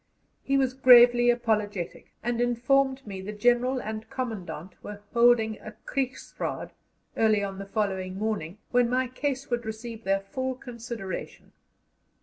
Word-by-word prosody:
He 275 0 +1
was 260 -2 +2
gravely 245 -2 +7
apologetic, 215 -6 -1
and 240 0 0
informed 265 +3 +2
me 195 -3 -6
the 200 +2 -5
General 245 +4 +2
and 220 -1 -6
Commandant 195 - -5
were 205 0 -8
holding 235 -2 +4
a 215 - -10
Kriegsraad 265 -2 -3 0.4
early 215 -2 +3
on 195 -1 -4
the 195 - -7
following 190 -3 -2
morning, 205 -4 -3
when 245 -1 +3
my 255 +1 +1
case 265 +1 -3
would 240 0 0
receive 220 +1 -7
their 195 0 +1
full 260 +6 -3
consideration. 235 -6 -7
235 Hz, 135 wpm, -27 LUFS, 205-250 Hz, 0.4 s, gravely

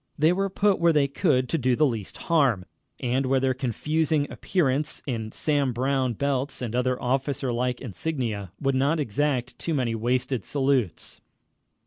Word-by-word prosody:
They 155 +4 +4
were 195 +2 0
put 200 +1 +2
where 170 0 +5
they 145 -3 +3
could 140 -3 +2
do 130 -3 +1
the 155 - +4
least 115 -8 -3
harm, 135 - +2 0.4
and 130 +2 0
where 135 0 +3
their 130 0 +1
confusing 145 +5 0
appearance, 150 -5 0
in 115 -5 -3
Sam 145 -4 0
Brown 130 0 0
belts 140 +3 -1
and 120 -3 -4
other 125 0 +1
officer 135 0 -1
like 125 +1 -1
insignia, 115 - -3
would 135 -1 +1
not 140 +5 +2
exact 130 -1 -1
too 165 - -1
many 125 -4 0
wasted 125 +1 0
salutes. 135 - 0
130 Hz, 155 wpm, -26 LUFS, 125-145 Hz, 0.4 s, where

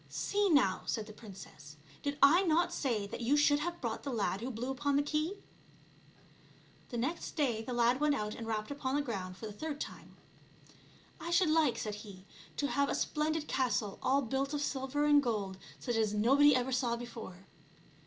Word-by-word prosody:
" - - -27 0.2
See 410 0 +2
now,'* 255 - +3
said 220 - -1
the 215 - -11
princess, 185 -9 -12
" 140 - -23
did 285 0 -2
I 320 +6 +7
not 345 -1 +2
say 235 -10 -1
that 200 - -7
you 260 +5 +3
should 290 0 +4
have 345 +3 -3
brought 230 -3 -3
the 280 - -5
lad 205 -3 -1
who 245 - -3
blew 245 +2 -3
upon 270 +2 0
the 285 - +3
key?" 310 +6 -1 1.5
The 240 - -4
next 265 +9 -3
day 250 -8 +1
the 225 - -6
lad 240 +1 +3
went 300 -1 +3
out 210 -3 -3
and 230 - -7
rapped 215 +2 -2
upon 280 -2 -2
the 290 - +1
ground 185 -8 -5
for 220 - -8
the 215 - -6
third 295 +6 -5
time. - - -8 0.5
'' - - -26
I 335 - -5
should 345 -1 +3
like," 305 -7 +3
said 210 -2 -3
he, 195 -3 -12
'' - - -20
to 285 - 0
have 280 0 +1
a - - 0
splendid 310 0 -1
castle 235 -6 0
all 275 +2 +2
built 270 +4 -1
of 290 - -1
silver 275 +1 -1
and 295 -1 +6
gold, 205 -7 -2 0.2
such 225 - -2
as 215 -2 +1
nobody 275 +6 +5
ever 255 +1 0
saw 245 -2 +1
before." 225 -6 -9
260 Hz, 210 wpm, -33 LUFS, 220-290 Hz, 1.5 s, I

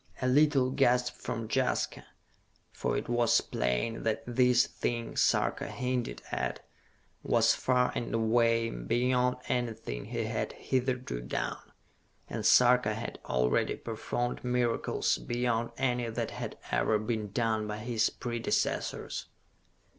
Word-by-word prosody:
A 130 - 0
little 135 -1 +4
gasp 125 -2 +2
from 115 -2 -5
Jaska, 130 +3 -1 0.6
for - - -1
it - - -3
was 120 -1 +3
plain 60 - -1
that 110 -1 -1
this 125 0 +4
thing 120 -1 -3
Sarka - - +2
hinted 125 -1 -3
at - - -3 0.6
was - - +3
far 125 -1 +2
and 120 - -3
away 115 0 +2
beyond 125 - +1
anything 115 - -2
he - - -3
had - - -2
hitherto 125 - -2
done 60 +1 -3 0.7
and - - -4
Sarka 125 -3 +5
had 110 - -6
already 60 -1 +1
performed 120 0 -3
miracles 125 - 0
beyond 120 - -1
any 125 -2 0
that 115 0 -3
had - - -6
ever 65 - +2
been 110 -1 -2
done 110 -2 0
by 105 0 -4
his 115 0 +1
predecessors. 120 -1 -2
120 Hz, 125 wpm, -30 LUFS, 110-125 Hz, 0.7 s, Sarka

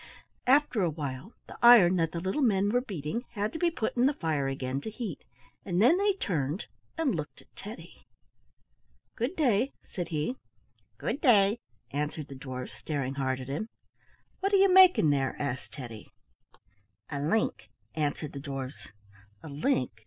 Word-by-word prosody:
After 265 -4 +4
a 175 - +2
while 145 - -6
the - - -12
iron 210 -7 +8
that 165 -2 +1
the 170 - -3
little 190 - -1
men 205 -5 +3
were 245 +2 +2
beating 195 - -4
had 210 +1 -2
to 320 - -4
be 345 - +3
put 225 -10 -3
in 245 +1 +4
the 285 - 0
fire 155 - -1
again 135 0 -3
to 220 - -5
heat, 220 -2 -6 0.4
and 180 -2 -1
then 245 - +6
they 405 0 +3
turned 165 - -2 0.3
and 320 -7 +1
looked 150 -4 -5
at - - -37
Teddy. - - -11 1.1
"Good 245 +10 -2
day," 255 - +2
said 175 -2 -4
he. 160 - -2 0.6
"Good 285 - -3
day," 210 -4 +5 0.3
answered 150 +1 -3
the 135 - -8
dwarfs, 130 -1 -7
staring 140 -4 -3
hard 130 -1 -1
at 130 - -8
him. 150 +12 -4 0.7
"What 390 +1 0
are - - +7
you 385 -1 +5
making 365 - +7
there?" 135 -2 0
asked 135 -3 -4
Teddy. 120 -6 -9 1.0
"A 140 - -3
link," 155 - 0 0.2
answered 150 -1 -2
the 140 - -6
dwarfs. 135 -2 -6 0.6
"A - - -8
link!" 145 - 0
175 Hz, 165 wpm, -29 LUFS, -, 1.1 s, iron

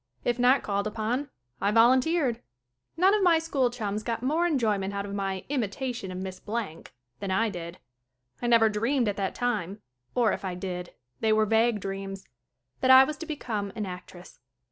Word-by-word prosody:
If 240 0 0
not 255 +2 +4
called 200 0 -1
upon 230 +6 -2 0.3
I 200 - +2
volunteered. 250 +3 +3 0.6
None 375 +4 +5
of 425 - +2
my 350 -3 +5
school 290 -6 +1
chums 215 -4 -3
got 230 +1 -3
more 320 +6 +2
enjoyment 210 - 0
out 200 0 -2
of 200 - -6
my 195 -2 -3
"imitation 245 -4 -3
of 180 - -6
Miss 185 0 -6
Blank" 210 -7 -5 0.3
than 200 - -4
I 220 +4 +2
did. 170 -1 -7 0.6
I 240 - -1
never 230 -2 +6
dreamed 230 +4 +1
at 205 - -1
that 195 -2 -2
time 210 -5 -2 0.4
or, 235 -4 +3
if - - -5
I 185 -2 -3
did, 180 -1 -6 0.2
they 220 - +2
were 215 0 +4
vague 225 +1 +2
dreams 195 0 -6 0.5
that 260 - +1
I 260 0 +10
was 300 +3 -2
to 330 - -7
become 220 -10 -3
an 215 - -3
actress. 180 -1 -10
220 Hz, 185 wpm, -27 LUFS, 195-255 Hz, 0.6 s, I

